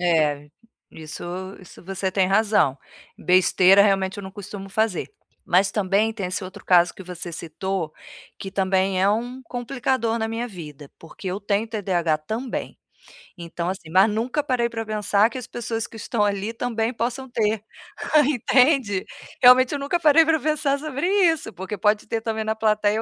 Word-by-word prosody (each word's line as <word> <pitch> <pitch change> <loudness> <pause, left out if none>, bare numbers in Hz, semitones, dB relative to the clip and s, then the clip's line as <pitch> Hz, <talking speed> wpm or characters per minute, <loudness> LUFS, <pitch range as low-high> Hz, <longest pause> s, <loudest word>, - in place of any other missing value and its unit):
É, 150 -4 +1 0.4
isso 160 +1 -9 0.4
isso 185 - -15
você 190 0 -3
tem 190 -2 +2
razão, 200 -9 +2 0.4
besteira, 185 +2 +5
realmente, 195 -1 +1
eu - - -6
não 190 - -8
costumo 195 0 -9
fazer, 220 - -1 0.3
mas 195 +2 +2
também 210 +2 +1
tem 200 -4 -4
esse 185 +1 -3
outro 185 - -11
caso 175 -1 +4
que 190 - -10
você 180 -1 -7
citou, 170 0 -4 0.5
que 195 - -6
também 190 0 +1
é 200 - +4
um 245 +4 -3
complicador 245 -1 -2
na 225 -1 -2
minha 230 +2 -3
vida, 150 - -10
porque 165 +4 -12
eu 185 +3 -3
tenho 205 +2 0
TDAH 180 -7 0
também. 225 +11 -5 0.6
Então 170 0 -5
assim, 185 -4 -6
mas 190 +5 +5
nunca 245 +7 -1
parei 240 -3 0
para 225 -1 -4
pensar 210 0 +2
que 245 - -9
as 250 - -6
pessoas 225 -1 -4
que 225 - -14
estão 215 0 -1
ali 205 +2 -2
também 230 0 -2
possam 245 +3 -3
ter, 215 -3 0 0.6
entende. 255 -5 +2 0.4
Realmente 250 +2 +7
eu 285 - -2
nunca 285 +5 -1
parei 320 0 +6
para 320 -1 +2
pensar 295 -1 0
sobre 300 +2 -3 0.2
isso, 325 -8 0
porque 190 +3 -6
pode 210 +1 +1
ter 225 +1 -2
também 220 -1 -2
na 220 0 -1
plateia 215 0 +1
210 Hz, 170 wpm, -23 LUFS, 190-235 Hz, 0.6 s, Realmente